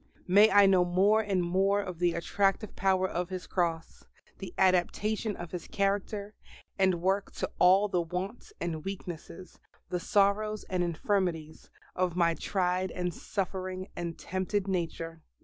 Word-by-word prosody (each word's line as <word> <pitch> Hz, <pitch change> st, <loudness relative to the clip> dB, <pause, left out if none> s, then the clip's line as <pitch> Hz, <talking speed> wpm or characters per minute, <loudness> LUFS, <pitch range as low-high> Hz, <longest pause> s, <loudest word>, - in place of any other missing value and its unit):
May 205 Hz, +4 st, +7 dB
I 205 Hz, 0 st, +7 dB
know 190 Hz, -2 st, +5 dB
more 195 Hz, +5 st, +3 dB
and 195 Hz, -4 st, 0 dB
more 195 Hz, +3 st, +2 dB
of 185 Hz, -4 st, -5 dB
the 175 Hz, -1 st, +2 dB
attractive 195 Hz, +4 st, 0 dB
power 190 Hz, 0 st, +2 dB
of 175 Hz, -1 st, -3 dB
His 185 Hz, -1 st, -5 dB
Cross 165 Hz, -3 st, -2 dB, 0.4 s
the 190 Hz, -3 st, -7 dB
adaptation 200 Hz, +3 st, +1 dB
of 170 Hz, -1 st, -8 dB
His 180 Hz, -, -6 dB
character 200 Hz, +1 st, -1 dB, 0.5 s
and 185 Hz, -3 st, +2 dB
work 195 Hz, +1 st, +1 dB
to -, -, -4 dB
all 190 Hz, +3 st, +6 dB
the 180 Hz, -3 st, 0 dB
wants 180 Hz, -, -5 dB
and 160 Hz, -3 st, -3 dB
weaknesses, 185 Hz, -2 st, -8 dB, 0.3 s
the 180 Hz, 0 st, -1 dB
sorrows 205 Hz, +3 st, +1 dB
and 180 Hz, -1 st, +1 dB
infirmities, 170 Hz, -2 st, -2 dB, 0.3 s
of 180 Hz, -2 st, 0 dB
my 170 Hz, -2 st, +3 dB
tried 185 Hz, +1 st, -1 dB
and 180 Hz, -1 st, -3 dB
suffering 185 Hz, 0 st, -4 dB
and 170 Hz, -1 st, -4 dB
tempted 190 Hz, +2 st, -2 dB
nature. 165 Hz, -3 st, -3 dB
185 Hz, 150 wpm, -29 LUFS, 175-200 Hz, 0.5 s, May